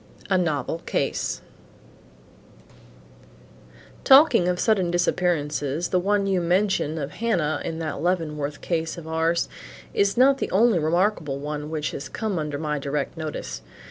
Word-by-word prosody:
A 190 Hz, -, +5 dB
NOVEL 160 Hz, -1 st, -1 dB
CASE -, -, -1 dB, 2.6 s
"Talking 265 Hz, -, +6 dB
of 180 Hz, 0 st, 0 dB
sudden 195 Hz, -6 st, +2 dB
disappearances 160 Hz, -3 st, 0 dB
the 185 Hz, -, +2 dB
one 200 Hz, +2 st, +1 dB
you 190 Hz, -2 st, +1 dB
mention 175 Hz, -3 st, +1 dB
of 145 Hz, -2 st, -4 dB
Hannah 170 Hz, -10 st, -1 dB
in 165 Hz, -1 st, -4 dB
that 155 Hz, -3 st, -4 dB
Leavenworth 150 Hz, -4 st, -2 dB
case 165 Hz, -1 st, -2 dB
of 165 Hz, -2 st, -9 dB
ours, 160 Hz, +1 st, +1 dB, 0.5 s
is 200 Hz, +2 st, +1 dB
not 270 Hz, +2 st, +5 dB
the -, -, -2 dB
only 215 Hz, -1 st, +4 dB
remarkable 165 Hz, -2 st, 0 dB
one 150 Hz, +1 st, -5 dB
which 155 Hz, -1 st, -2 dB
has 140 Hz, -, -6 dB
come 215 Hz, -6 st, -2 dB
under 150 Hz, -2 st, -3 dB
my 150 Hz, -1 st, -2 dB
direct 140 Hz, +2 st, -3 dB
notice. 150 Hz, -, -5 dB
165 Hz, 140 wpm, -24 LUFS, 150-190 Hz, 2.6 s, Talking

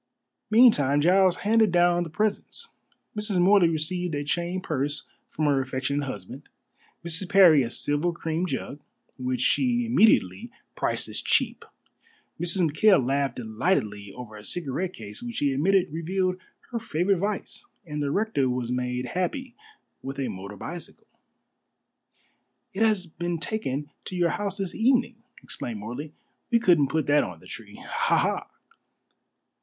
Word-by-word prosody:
Meantime 215 Hz, -, +5 dB
Giles 185 Hz, +3 st, +4 dB
handed 220 Hz, -1 st, +4 dB
down 175 Hz, 0 st, +3 dB
the 170 Hz, -, -3 dB
presents. 215 Hz, -, -2 dB, 0.5 s
Mrs. 210 Hz, -2 st, -1 dB
Morley 185 Hz, -1 st, +5 dB
received 165 Hz, +1 st, -2 dB
a 145 Hz, -, -2 dB
chain 175 Hz, +5 st, -1 dB
purse 145 Hz, -5 st, -2 dB, 0.3 s
from 155 Hz, -, -2 dB
her 140 Hz, -2 st, +3 dB
affectionate 135 Hz, +2 st, -2 dB
husband; 100 Hz, -8 st, -7 dB, 0.6 s
Mrs. 170 Hz, +2 st, -2 dB
Parry 180 Hz, -7 st, +7 dB
a 120 Hz, -, -1 dB
silver 145 Hz, +7 st, +1 dB
cream 165 Hz, +1 st, -2 dB
jug, 145 Hz, -, -4 dB, 0.4 s
which 125 Hz, -1 st, -2 dB
she 245 Hz, -, +2 dB
immediately 205 Hz, -, +3 dB, 0.3 s
priced -, -, -1 dB
as -, -, -4 dB
cheap; -, -, +1 dB, 0.8 s
Mrs. 175 Hz, +1 st, +2 dB
McKail 155 Hz, -, +4 dB
laughed 135 Hz, -1 st, 0 dB
delightedly 110 Hz, -, -1 dB
over 120 Hz, -4 st, -9 dB
a 105 Hz, -, -11 dB
cigarette 175 Hz, -, -2 dB
case, 105 Hz, -2 st, -9 dB
which 240 Hz, -1 st, -6 dB
she 140 Hz, -2 st, +1 dB
admitted 180 Hz, +4 st, +2 dB
revealed 185 Hz, +3 st, -1 dB, 0.3 s
her 235 Hz, -, -2 dB
favorite 185 Hz, -2 st, 0 dB
vice; 205 Hz, +1 st, -3 dB, 0.2 s
and 150 Hz, -2 st, -4 dB
the 145 Hz, -, 0 dB
rector 195 Hz, -7 st, +1 dB
was 125 Hz, -1 st, -2 dB
made 125 Hz, 0 st, -2 dB
happy 235 Hz, -, -3 dB, 0.5 s
with 135 Hz, +1 st, -6 dB
a 130 Hz, -3 st, -1 dB
motor 100 Hz, 0 st, -7 dB
bicycle. 170 Hz, -, -8 dB, 1.7 s
"It 195 Hz, -, -4 dB
has 215 Hz, -4 st, +3 dB
been 170 Hz, +1 st, -4 dB
taken 150 Hz, -7 st, -3 dB
to 185 Hz, -, -6 dB
your 175 Hz, -1 st, +2 dB
house 200 Hz, +2 st, -3 dB
this 195 Hz, -3 st, -3 dB
evening," 245 Hz, 0 st, +2 dB, 0.3 s
explained 115 Hz, -3 st, -5 dB
Morley. 125 Hz, +8 st, -6 dB, 0.4 s
"We 235 Hz, -, +4 dB
couldn't 175 Hz, -, +4 dB
put 155 Hz, +1 st, -1 dB
that 145 Hz, +1 st, +4 dB
on 90 Hz, -3 st, -7 dB
the -, -, -18 dB
tree. -, -, -10 dB
Ha! -, -, +1 dB
ha!" -, -, 0 dB
165 Hz, 150 wpm, -26 LUFS, 135-195 Hz, 1.7 s, Parry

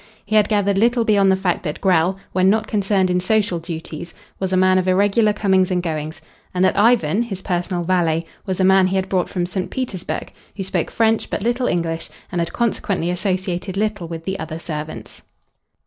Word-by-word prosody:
He 215 Hz, +2 st, -1 dB
had 210 Hz, -1 st, +4 dB
gathered 200 Hz, -2 st, +2 dB
little 235 Hz, +1 st, +3 dB
beyond 200 Hz, -3 st, +4 dB
the -, -, +4 dB
fact 190 Hz, -2 st, -1 dB
that 150 Hz, -4 st, -4 dB
Grell, 185 Hz, 0 st, +2 dB
when 185 Hz, 0 st, +3 dB
not 215 Hz, +2 st, +2 dB
concerned 195 Hz, -3 st, +1 dB
in 180 Hz, -, +2 dB
social 200 Hz, -2 st, +1 dB
duties, 165 Hz, 0 st, -7 dB, 0.2 s
was 190 Hz, -1 st, -2 dB
a 185 Hz, -, +2 dB
man 185 Hz, 0 st, +4 dB
of 185 Hz, -, -2 dB
irregular 205 Hz, +3 st, +3 dB
comings 190 Hz, -3 st, +2 dB
and 180 Hz, -1 st, 0 dB
goings, 155 Hz, -1 st, -4 dB, 0.3 s
and 180 Hz, +1 st, +3 dB
that 185 Hz, -, +2 dB
Ivan, 210 Hz, -4 st, +3 dB
his 195 Hz, -6 st, -5 dB
personal 175 Hz, 0 st, -1 dB
valet, 165 Hz, -2 st, +1 dB, 0.2 s
was 190 Hz, -2 st, -3 dB
a -, -, +3 dB
man 190 Hz, 0 st, +5 dB
he 190 Hz, -, -1 dB
had 190 Hz, 0 st, -1 dB
brought 185 Hz, -2 st, 0 dB
from 180 Hz, -3 st, -1 dB
St. 185 Hz, +1 st, -3 dB
Petersburg, 215 Hz, -9 st, -4 dB, 0.2 s
who 195 Hz, -, -4 dB
spoke 190 Hz, -, -2 dB
French 225 Hz, -1 st, +1 dB
but -, -, -3 dB
little 245 Hz, +2 st, 0 dB
English, 165 Hz, -2 st, -1 dB, 0.2 s
and 175 Hz, -2 st, -1 dB
had 170 Hz, -, -2 dB
consequently 200 Hz, -6 st, -1 dB
associated 185 Hz, 0 st, -2 dB
little 210 Hz, -4 st, -1 dB
with 165 Hz, -1 st, -7 dB
the 190 Hz, 0 st, -3 dB
other 160 Hz, 0 st, -5 dB
servants. 155 Hz, -2 st, -7 dB
185 Hz, 200 wpm, -20 LUFS, 175-205 Hz, 0.3 s, man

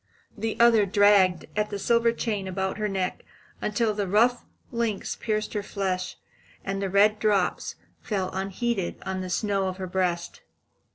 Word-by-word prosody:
The 220 Hz, +1 st, -3 dB
other 230 Hz, -3 st, +6 dB
dragged 200 Hz, -3 st, +4 dB
at 210 Hz, 0 st, 0 dB
the 205 Hz, -, -3 dB
silver 235 Hz, +3 st, +3 dB
chain 210 Hz, -4 st, -2 dB
about 190 Hz, +2 st, -2 dB
her 210 Hz, -, 0 dB
neck 190 Hz, -2 st, -2 dB, 0.4 s
until 215 Hz, +1 st, +1 dB
the 205 Hz, -1 st, -2 dB
rough 235 Hz, +6 st, +3 dB, 0.3 s
links 230 Hz, -4 st, -2 dB
pierced 215 Hz, -1 st, -2 dB
her 210 Hz, -, -1 dB
flesh, 190 Hz, -2 st, -3 dB, 0.5 s
and 195 Hz, 0 st, -2 dB
the 195 Hz, -, -1 dB
red 210 Hz, +2 st, +4 dB
drops 200 Hz, -4 st, +1 dB, 0.3 s
fell 190 Hz, -4 st, -2 dB
unheeded 195 Hz, +1 st, -2 dB
on 190 Hz, 0 st, -2 dB
the 185 Hz, -, -5 dB
snow 195 Hz, +1 st, 0 dB
of 185 Hz, 0 st, -4 dB
her 190 Hz, -, -4 dB
breast. 180 Hz, -2 st, -2 dB
200 Hz, 160 wpm, -26 LUFS, 190-215 Hz, 0.5 s, other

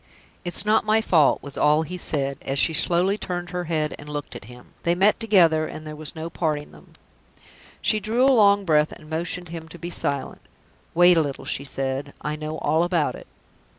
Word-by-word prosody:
"It's 175 Hz, +3 st, 0 dB
not 215 Hz, +1 st, +3 dB
my 215 Hz, +1 st, +3 dB
fault," 165 Hz, -9 st, +3 dB
was 140 Hz, -1 st, -6 dB
all 150 Hz, +2 st, +3 dB
he 180 Hz, +3 st, -7 dB
said, 140 Hz, -6 st, -1 dB
as 135 Hz, +1 st, -3 dB
she 160 Hz, -, +3 dB
slowly 180 Hz, +5 st, +2 dB
turned 175 Hz, -1 st, -4 dB
her 180 Hz, -1 st, -3 dB
head 155 Hz, -2 st, -1 dB
and 145 Hz, -, -10 dB
looked 145 Hz, -4 st, -6 dB
at 120 Hz, -, -9 dB
him. 125 Hz, +2 st, -15 dB
"They 170 Hz, +1 st, +1 dB
met 195 Hz, +4 st, +3 dB
together, 170 Hz, -8 st, +3 dB
and 155 Hz, -, -9 dB
there 155 Hz, 0 st, -7 dB
was 155 Hz, -1 st, -7 dB
no 160 Hz, 0 st, -5 dB
parting 155 Hz, -3 st, -3 dB
them." -, -, -18 dB, 0.9 s
She 215 Hz, -, +2 dB
drew 225 Hz, +5 st, +1 dB
a 270 Hz, -, +5 dB
long 200 Hz, -3 st, +4 dB
breath, 155 Hz, -2 st, +3 dB
and 155 Hz, -, -13 dB
motioned 170 Hz, +2 st, -3 dB
him 165 Hz, -1 st, -8 dB
to 175 Hz, -, -11 dB
be 175 Hz, +1 st, -7 dB
silent. 140 Hz, -4 st, -3 dB, 0.5 s
"Wait 175 Hz, 0 st, +6 dB
a -, -, +5 dB
little," 140 Hz, -3 st, -5 dB
she 140 Hz, -, -1 dB
said; 135 Hz, +1 st, -3 dB
"I 150 Hz, +1 st, -2 dB
know 155 Hz, +1 st, -5 dB
all 155 Hz, +2 st, +1 dB
about 175 Hz, -3 st, +1 dB
it." -, -, -12 dB
160 Hz, 210 wpm, -23 LUFS, 150-180 Hz, 0.9 s, Wait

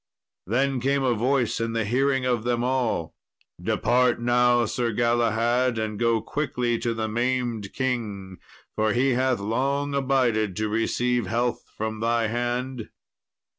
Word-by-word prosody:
Then 130 Hz, +5 st, +1 dB
came 135 Hz, +2 st, +1 dB
a 125 Hz, -2 st, +2 dB
voice 120 Hz, +1 st, 0 dB
in 115 Hz, 0 st, -2 dB
the 115 Hz, -1 st, 0 dB
hearing 130 Hz, +3 st, +1 dB
of 120 Hz, -3 st, 0 dB
them 120 Hz, 0 st, 0 dB
all, 125 Hz, -10 st, -1 dB, 0.5 s
"Depart 125 Hz, -1 st, +2 dB
now, 120 Hz, 0 st, +3 dB
Sir 120 Hz, +2 st, -1 dB
Galahad, 120 Hz, +1 st, +1 dB
and 110 Hz, -1 st, -3 dB
go 115 Hz, -1 st, +2 dB
quickly 120 Hz, -3 st, -1 dB
to 115 Hz, -1 st, -1 dB
the 110 Hz, -1 st, -2 dB
maimed 120 Hz, -2 st, -1 dB
king, 105 Hz, -8 st, -3 dB, 0.4 s
for 110 Hz, -1 st, +1 dB
he 130 Hz, +3 st, +2 dB
hath 130 Hz, 0 st, +1 dB
long 140 Hz, +7 st, -1 dB
abided 125 Hz, -7 st, +1 dB
to 110 Hz, 0 st, -1 dB
receive 120 Hz, +1 st, 0 dB
health 120 Hz, +4 st, -1 dB
from 110 Hz, 0 st, -3 dB
thy 115 Hz, 0 st, +1 dB
hand." 120 Hz, +1 st, -3 dB
120 Hz, 140 wpm, -25 LUFS, 110-125 Hz, 0.5 s, now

